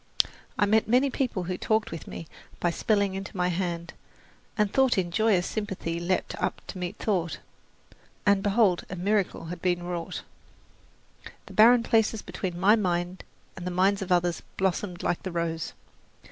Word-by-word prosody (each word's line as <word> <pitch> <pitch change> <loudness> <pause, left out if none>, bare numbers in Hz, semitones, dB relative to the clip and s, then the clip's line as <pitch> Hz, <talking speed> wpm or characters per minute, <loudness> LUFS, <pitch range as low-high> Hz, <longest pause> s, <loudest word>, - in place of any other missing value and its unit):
I 205 - +4
met 215 +2 +3
many 255 +4 +3
people 245 -9 -1
who 180 +1 -3
talked 220 0 +1
with 165 - -7
me 165 - -7 0.3
by 175 - +1
spelling 200 +1 +1
into 195 0 -6
my 180 0 +2
hand, 175 -1 -2 0.6
and 210 -2 +1
thought 265 -4 +4
in 175 -2 0
joyous 205 -2 +3
sympathy 190 -6 -3
leaped 180 +2 -1
up - - -1
to 185 - -6
meet 180 -1 -4
thought, 180 -6 -1 0.9
and 200 -1 +4
behold, 200 -3 +3
a 185 - -4
miracle 195 -1 0
had 175 - -9
been 175 -1 +1
wrought! 175 -1 -4 1.2
The - - -12
barren 230 +2 +7
places 225 -2 +2
between 180 -3 -4
my 205 +4 +6
mind 180 -3 -1 0.3
and 180 -1 -6
the - - 0
minds 190 +3 +2
of 190 -1 -4
others 175 -1 +2 0.2
blossomed 190 -1 -1
like 175 - 0
the 185 - -5
rose. 165 -1 -2
185 Hz, 165 wpm, -27 LUFS, 175-210 Hz, 1.2 s, barren